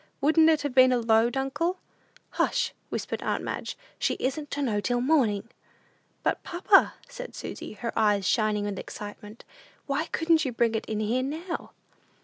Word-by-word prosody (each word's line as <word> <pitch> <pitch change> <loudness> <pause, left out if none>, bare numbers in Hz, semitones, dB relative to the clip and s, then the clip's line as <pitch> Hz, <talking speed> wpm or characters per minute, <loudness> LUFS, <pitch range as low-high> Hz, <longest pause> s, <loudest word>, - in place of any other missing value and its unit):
"Wouldn't 315 +3 +5
it 310 -2 +3
have 285 -3 -2
been 255 0 +7
a 250 - +3
load, 230 +2 +3
uncle?" 300 +7 -1 0.5
"Hush!" - - 0 0.2
whispered - - -3
aunt - - -1
Madge; - - -4 0.2
"she - - +1
isn't 290 +3 -3
to 285 - -2
know 215 -6 0
till 245 +2 0
morning." 240 -7 +2 0.8
"But, - - 0
papa," 370 +3 +4
said - - -8
Susy, - - -7
her 230 +2 -5
eyes 205 -3 +2
shining 215 -2 +2
with 200 -2 -3
excitement, 210 +1 -9 0.4
"why 280 +3 -1
couldn't 325 -1 +2
you 260 -4 -2
bring 230 -1 +2
it 220 - -2
in 215 -1 -2
here 230 +4 +1
now?" 320 +6 -5
255 Hz, 165 wpm, -27 LUFS, 220-310 Hz, 0.8 s, been